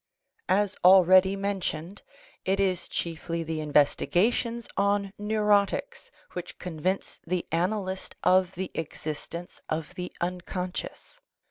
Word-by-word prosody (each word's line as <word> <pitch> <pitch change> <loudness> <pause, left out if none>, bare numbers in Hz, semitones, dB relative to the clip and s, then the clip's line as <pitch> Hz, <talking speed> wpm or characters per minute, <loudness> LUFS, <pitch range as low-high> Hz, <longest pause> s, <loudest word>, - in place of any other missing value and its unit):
As 205 0 +2
already 185 +1 +7
mentioned, 195 -2 -3 0.4
it 195 +1 +1
is 185 -2 +1
chiefly 165 0 -3
the 160 0 -3
investigations 180 - +2
on 200 0 +1
neurotics 210 - +1 0.2
which 180 -1 -6
convince 180 +2 -3
the 180 0 -1
analyst 190 +3 -1
of 185 0 +4
the 185 +1 -4
existence 165 +2 -5
of 155 0 -3
the 180 0 -5
unconscious. 180 - -4
185 Hz, 105 wpm, -27 LUFS, 170-200 Hz, 0.4 s, already